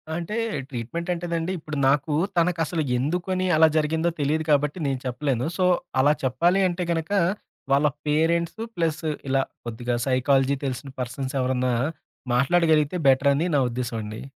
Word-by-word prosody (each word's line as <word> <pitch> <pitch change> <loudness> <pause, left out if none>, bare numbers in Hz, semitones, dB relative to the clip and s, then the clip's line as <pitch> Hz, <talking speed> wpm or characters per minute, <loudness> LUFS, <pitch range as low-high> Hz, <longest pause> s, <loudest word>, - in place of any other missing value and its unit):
అంటే 175 +6 -3 0.3
ట్రీట్మెంట్ 135 +8 -5
అంటేనండి, 170 0 -2
ఇప్పుడు 155 -1 -6
నాకు 145 +1 +1 0.2
తనకసలు 165 -1 +1
ఎందుకని 180 +7 -1
అలా 160 +1 +6
జరిగిందో 160 +2 +1
తెలిదు 155 +2 0
కాబట్టి, 145 +2 +2
నేను 135 -2 -1
చెప్పలేను. 125 -1 -1
సో, 185 - +2 0.4
అలా 145 +2 +5
చెప్పాలి 170 +9 +2
అంటే 180 0 -2
గనక, 165 +1 -2 0.6
వాళ్ళ 140 +2 +4 0.2
పేరెంట్సు 165 +6 +1
ప్లస్ 165 -1 -1 0.3
ఇలా 135 0 +2 0.2
కొద్దిగా 120 +1 -3
సైకాలజీ 135 +1 +2
తెలిసిన 135 +1 -4
పర్సన్స్ 130 +2 -4
ఎవరన్నా 125 -1 0 0.6
మాట్లాడగలిగితే 155 +3 +3
బెటర్ 135 +1 +5
అని 155 +5 0
నా - - +4
ఉద్దేశం 120 -1 -3
అండి. 105 +1 -7
150 Hz, 140 wpm, -24 LUFS, 130-170 Hz, 0.6 s, అలా